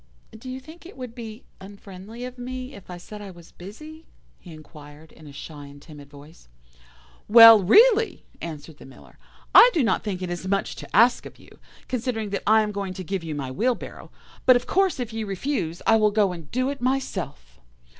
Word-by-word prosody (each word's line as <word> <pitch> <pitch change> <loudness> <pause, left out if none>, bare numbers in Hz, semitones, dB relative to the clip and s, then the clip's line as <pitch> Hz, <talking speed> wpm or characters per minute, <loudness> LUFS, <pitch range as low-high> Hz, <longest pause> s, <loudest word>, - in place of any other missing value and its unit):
"'Do 235 +4 -10
you 260 +1 -6
think 315 +6 -15
it 365 +4 -13
would 250 -3 -8
be 225 -1 -9 0.2
unfriendly 200 +4 -11
of 250 0 -10
me 255 +2 -7
if 200 -7 -14
I 180 - -7
said 210 +4 -11
I 200 - -9
was 170 -2 -15
busy?' 305 - -12 0.3
he 175 - -14
inquired 155 0 -14
in 155 - -16
a - - -11
shy 145 0 -10
and 140 0 -14
timid 145 -2 -14
voice. 145 - -16 0.8
"'Well, 230 0 +9
really,' 445 - +4 0.2
answered 155 -2 -8
the - - -13
Miller, 135 - -18 0.3
'I - - +9
do 310 - +2
not 225 - 0
think 185 -4 -4
it 180 - -4
is 175 +1 -5
much 195 0 -1
to - - -9
ask 235 +4 +4
of - - -16
you, - - -19 0.3
considering 235 -4 -3
that 200 - -2
I 220 +1 +5
am 210 - -3
going 200 -2 -5
to 185 - -6
give 185 0 -4
you 160 -2 -5
my 135 -3 -5
wheelbarrow; 240 - -3 0.4
but 255 - +8
of 245 - -1
course 380 -5 +1
if 240 -3 -5
you 220 -1 -4
refuse 195 - -3
I 225 - +5
will 215 -1 +3
go 205 -2 +1
and 165 -4 -10
do 255 +2 -1
it 280 - -8
myself. 185 - -4
205 Hz, 205 wpm, -24 LUFS, 170-250 Hz, 0.8 s, Well